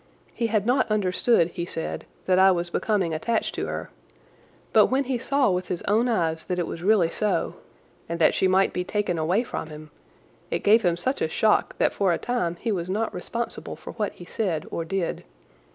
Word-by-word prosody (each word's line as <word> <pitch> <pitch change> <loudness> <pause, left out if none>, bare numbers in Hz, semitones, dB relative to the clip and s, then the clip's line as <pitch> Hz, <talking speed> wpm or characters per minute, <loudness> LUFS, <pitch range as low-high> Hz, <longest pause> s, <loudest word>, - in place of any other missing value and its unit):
He 230 - -1
had 215 -2 0
not 250 +1 +2
understood, 200 -2 +2
he 170 0 -5
said, 165 -2 -5 0.2
that 185 0 +3
I 190 0 +7
was 175 -2 0
becoming 190 -6 0
attached 225 +9 -1
to - - -3
her, - - -5 0.8
but - - +7
when 265 +2 +1
he 260 -2 -2
saw 275 -2 +2
with 180 0 -1
his 175 - -3
own 220 +4 +2
eyes 165 -7 0
that 180 - -2
it 175 - 0
was 165 - -6
really 185 -3 +3
so, 210 - -1 0.5
and 170 - -2
that 165 - +4
she 190 - +2
might 190 +1 +3
be 180 - -1
taken 195 -3 -1
away 180 +9 +2
from 235 - -5
him, 155 0 -10 0.6
it - - -2
gave 220 +3 +6
him 175 -4 +1
such 260 +10 -2
a 160 - +1
shock 215 +6 +2
that - - +2
for 195 -3 +2
a 170 - +1
time 180 -9 -1
he 225 +6 -3
was 180 -3 -2
not 215 +4 -1
responsible 235 0 -4
for - - -9
what 210 -3 -2
he 175 - -12
said 175 -5 -2
or 165 - -2
did. 180 +1 -2
190 Hz, 210 wpm, -25 LUFS, 170-220 Hz, 0.8 s, I